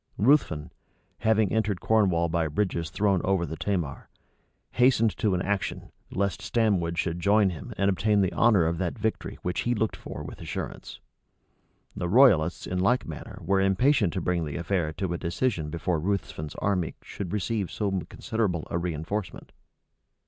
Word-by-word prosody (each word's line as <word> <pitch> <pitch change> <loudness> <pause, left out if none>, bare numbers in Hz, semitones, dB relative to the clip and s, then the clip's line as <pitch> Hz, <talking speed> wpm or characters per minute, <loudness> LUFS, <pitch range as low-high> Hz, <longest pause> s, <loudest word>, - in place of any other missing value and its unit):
Ruthven, 100 - +2 0.5
having 110 -2 +2
entered 105 -4 0
Cornwall 95 -6 +2
by 85 -1 0
bridges 85 0 -1
thrown 100 -3 +1
over 95 -3 +1
the 80 - -5
Tamar, 85 -5 -3 0.6
hastened 125 -3 +3
to 100 -4 +1
an 90 - -1
action, 100 0 -2 0.2
lest 100 +1 -1
Stamwood 95 -6 +1
should 85 -1 -1
join 100 +2 +4
him, 90 +8 -8
and 100 - +2
obtain 100 +1 +2
the 95 - +1
honor 105 -8 +4
of 85 +1 -1
that 90 +2 -2
victory 110 0 -2
which 90 -1 -2
he 120 0 0
looked 110 0 0
for - - -8
with - - -9
assurance. - - -6 1.0
The 85 - -2
royalists 95 - +5
in 90 - -2
like 100 +7 +2
manner 80 -2 -8
were 95 +2 +3
impatient 100 - +3
to 95 - -2
bring 85 -1 0
the 75 -2 -5
affair 85 -2 -1
to 90 +1 -2
a 85 - -3
decision 85 -2 -1
before 85 +1 -1
Ruthven's 85 -4 -3
army 95 -5 -1
should 90 -4 -6
receive 105 -1 -1
so 105 -2 -2 0.2
considerable 100 -8 -2
a - - 0
reënforcement. 85 +4 -4
95 Hz, 165 wpm, -27 LUFS, 85-105 Hz, 1.0 s, royalists